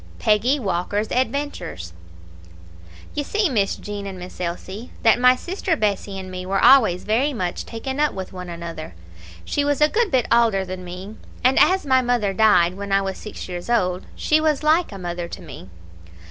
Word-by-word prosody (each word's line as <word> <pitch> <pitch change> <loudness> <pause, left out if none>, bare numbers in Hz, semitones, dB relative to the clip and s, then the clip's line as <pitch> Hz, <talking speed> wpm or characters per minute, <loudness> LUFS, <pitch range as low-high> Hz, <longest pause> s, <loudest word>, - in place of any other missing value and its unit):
Peggy 225 +7 +2
Walker's 205 0 -2
Adventures 250 - -2 1.2
"You 290 - -2
see, 415 +4 0
Miss 205 -7 +1
Jean 205 -1 -6
and 190 -1 -7
Miss 180 0 -9
Elsie, 185 +6 -5
that 225 +1 +5
my 250 +1 +6
sister 355 +4 -2
Bessie 200 -4 -1
and 185 -1 -7
me 185 0 -5
were 195 +1 -1
always 230 -9 +5
very 250 +7 +1
much 180 -7 -3
taken 265 +4 -5
up 300 0 +3
with 190 -1 -7
one 180 -1 -7
another; 170 - -7 0.5
she 290 - 0
was 290 0 0
a 300 - +6
good 455 +2 +1
bit 260 -6 +2
aulder 225 -5 +3
than 185 0 -6
me, 185 +4 -8 0.3
and 255 +1 +4
as 370 +4 +4
my 260 -2 +4
mother 240 -5 0
died 185 -5 +4
when 200 0 -6
I 195 0 +3
was 190 -1 -4
six 210 - -8
years 175 +3 -6
old, 185 -6 0
she 310 0 +2
was 310 -2 +1
like 315 +1 +3
a 200 - -7
mother 175 -1 -4
to - - -8
me. 95 - -11
210 Hz, 190 wpm, -22 LUFS, 185-265 Hz, 1.2 s, my